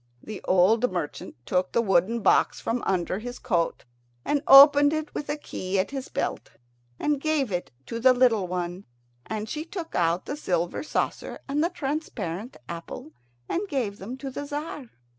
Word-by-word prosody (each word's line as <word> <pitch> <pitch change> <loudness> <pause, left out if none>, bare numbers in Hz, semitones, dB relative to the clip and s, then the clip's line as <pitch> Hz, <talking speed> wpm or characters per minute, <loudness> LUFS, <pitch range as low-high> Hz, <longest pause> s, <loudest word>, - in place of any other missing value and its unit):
The 215 -2 -7
old 215 +7 +4
merchant 165 -4 -5
took 180 0 0
the 235 - +3
wooden 195 +4 +2
box - - +3
from 235 +1 -2
under 185 0 0
his 245 +2 -7
coat, 175 -9 -1 0.4
and 290 -1 +1
opened 285 +1 +9
it 310 -1 -3
with 290 - -5
a 295 - -1
key 190 -9 -4
at 190 +5 0
his 270 -2 -5
belt, - - -3 0.5
and 295 -2 0
gave 300 -7 0
it 180 -1 -2 0.2
to 230 - -5
the 255 +2 +6
little 245 -6 +3
one, 180 +1 -4 0.4
and 215 0 -4
she 305 +7 -4
took 340 -1 -7
out 170 +1 +1
the 285 - -4
silver 175 - -1
saucer - - -2
and 290 +3 0
the 340 - +2
transparent 250 - -4
apple 165 -1 -7 0.4
and 405 +4 -2
gave 235 - -2
them 235 +7 -6
to 270 0 -6
the 285 +3 -5
Tzar. 290 -3 -5
235 Hz, 175 wpm, -26 LUFS, 185-285 Hz, 0.5 s, opened